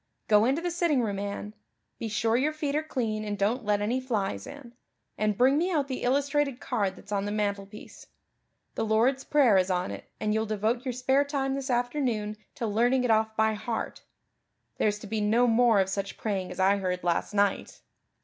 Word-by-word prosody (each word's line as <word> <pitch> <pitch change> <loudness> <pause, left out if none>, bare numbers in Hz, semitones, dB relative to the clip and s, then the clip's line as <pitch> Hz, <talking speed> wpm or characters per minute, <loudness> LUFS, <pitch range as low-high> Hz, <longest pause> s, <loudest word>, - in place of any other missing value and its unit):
Go 210 0 +5
into 275 +7 +1
the 350 - -1
sitting 335 -7 +1
room, 200 -3 -2
Anne 205 +1 -5 0.5
be 230 - -3
sure 225 +1 +1
your 285 +5 +1
feet 295 -2 -2
are 305 - +2
clean 225 -8 -2
and 205 -1 -3
don't 220 +6 0
let 205 -1 +1
any 240 +5 0
flies 200 - -2
in 260 -5 -11 0.4
and 210 -1 0
bring 265 +4 +4
me 350 +3 +1
out 295 -5 +1
the 260 -2 -4
illustrated 280 0 +1
card 210 -7 -1
that's 200 - -14
on 200 -1 0
the 205 - -2
mantelpiece. 205 -1 -4 0.7
The - - -2
Lord's 235 +5 +2
Prayer 255 -10 +4
is 185 0 0
on 180 0 -1
it - - -9
and 210 -1 0
you'll 220 0 0
devote 220 +4 -1
your 255 - -1
spare 265 +3 +2
time 275 -2 -2
this 270 0 -4
afternoon 245 -4 -1 0.2
to 235 - -3
learning 240 +4 +2
it 245 - +2
off 220 0 +2
by 220 0 +3
heart. 225 +2 -4 0.8
There's 210 -1 +2
to 210 - -11
be 215 +1 -2
no 225 +4 +3
more 230 -2 +4
of 190 - +2
such 195 0 -4
praying 195 -4 -2
as - - -8
I 195 +2 +4
heard 180 -2 -2
last 175 +4 -1
night." 200 0 0
220 Hz, 205 wpm, -28 LUFS, 205-260 Hz, 0.8 s, Go